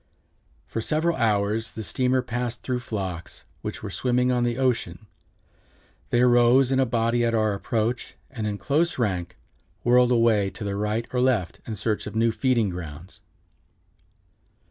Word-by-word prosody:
For 115 - -4
several 160 +7 0
hours 110 -2 +1
the 110 - -6
steamer 130 +3 +1
passed 120 -1 -4
through 125 -1 -1
flocks, 95 -8 -6 0.2
which - - -6
were - - -5
swimming 125 0 +1
on 125 -1 +1
the 120 0 0
ocean. 115 -7 -1 1.0
They 120 - +2
arose 125 +1 +5
in 135 - +2
a 130 - +3
body 115 +1 +1
at 115 -1 +1
our 110 -2 +2
approach, 115 +4 -2 0.2
and 110 -5 -3
in 105 -1 -2
close 155 +9 0
rank 90 -6 -2 0.5
whirled 125 +1 +4
away 115 -4 +3
to 110 - -8
the 100 -1 -2
right 105 +3 -1
or 125 - +1
left 120 -10 0
in 110 - -3
search 105 +1 -2
of 105 - -7
new 115 +1 +3
feeding 120 -4 +1
grounds." 85 0 -8
115 Hz, 160 wpm, -25 LUFS, 105-125 Hz, 1.0 s, arose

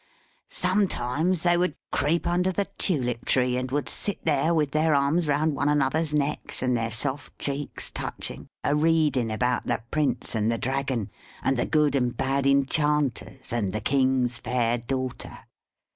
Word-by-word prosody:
Sometimes 180 -3 0
they 175 -1 +4
would 180 -3 0 0.2
creep 165 +5 +1
under 180 +2 +1
the 200 +2 -1
Tulip 125 -9 +1
tree, 125 -1 +2
and 125 0 -2
would 145 +2 -1
sit 205 - -1
there 155 +1 +2
with 150 -4 +1
their 155 0 +2
arms 145 +4 +2
round 150 +1 +1
one 140 +1 +1
another's 150 +2 +1
necks, 150 -2 -1
and 125 -1 +2
their 115 -1 -1
soft 135 +6 -2
cheeks 140 0 -2
touching, - - -5 0.2
a 145 - +2
reading 150 -7 +2
about 125 +3 0
the - - -1
Prince 150 -2 -1
and 110 0 +1
the 115 - 0
Dragon, 130 -4 -2 0.3
and 135 - +2
the 120 - 0
good 150 -3 +2
and 125 -3 0
bad 135 +1 +1
enchanters, 140 -2 0
and 105 -5 -1
the 110 - -1
king's 130 0 +1
fair 120 -1 0
daughter. 130 +1 -4
140 Hz, 160 wpm, -26 LUFS, 125-155 Hz, 0.3 s, they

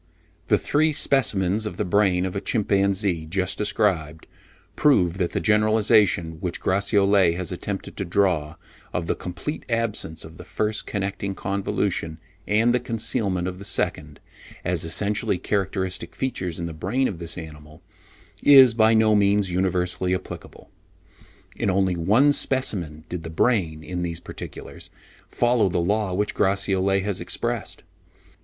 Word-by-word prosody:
"The - - +4
three 155 +1 +1
specimens 110 - +1
of 90 - -7
the - - -1
brain 95 -1 +2
of 95 - -4
a 100 - -2
chimpanzee, 100 -5 0
just 95 +3 0
described, 95 -7 -1 0.5
prove, 95 - +3
that 90 -2 -1
the - - 0
generalisation 105 -6 +3
which 90 0 -3
Gratiolet 100 -2 +2
has 90 0 -4
attempted 95 +2 -5
to - - -2
draw 85 -5 +1 0.4
of 85 - -2
the - - 0
complete 100 - -6
absence 115 -9 -2
of 80 +1 -13
the - - -10
first 110 0 -2
connecting 100 -1 -3
convolution 95 -4 -2 0.3
and 110 +3 +3
the 125 - +2
concealment 110 -6 -1
of 90 0 -6
the - - -9
second, 75 -6 -2 0.5
as 90 -1 +1
essentially 100 +3 +1
characteristic 95 -3 -3
features 90 -11 -3
in 85 - -3
the 85 - -5
brain 105 +12 0
of 90 - -6
this 85 -1 -4
animal, 75 -2 -11 0.6
is 135 -4 +8
by 110 0 +4
no 110 -1 +4
means 100 -2 +2
universally 90 0 0
applicable. 95 - -9 0.8
In 110 - -1
only 95 -1 +1
one 105 - +4
specimen 90 - -1
did 90 0 -5
the 80 - -7
brain, 80 -3 0
in 90 +1 -4
these 85 -2 -3
particulars, - - -9 0.4
follow 120 -4 +2
the 90 - -2
law 100 +3 0
which 105 +2 -1
Gratiolet 95 0 +1
has 100 -2 -2
expressed. - - -3
95 Hz, 145 wpm, -24 LUFS, 90-105 Hz, 0.8 s, is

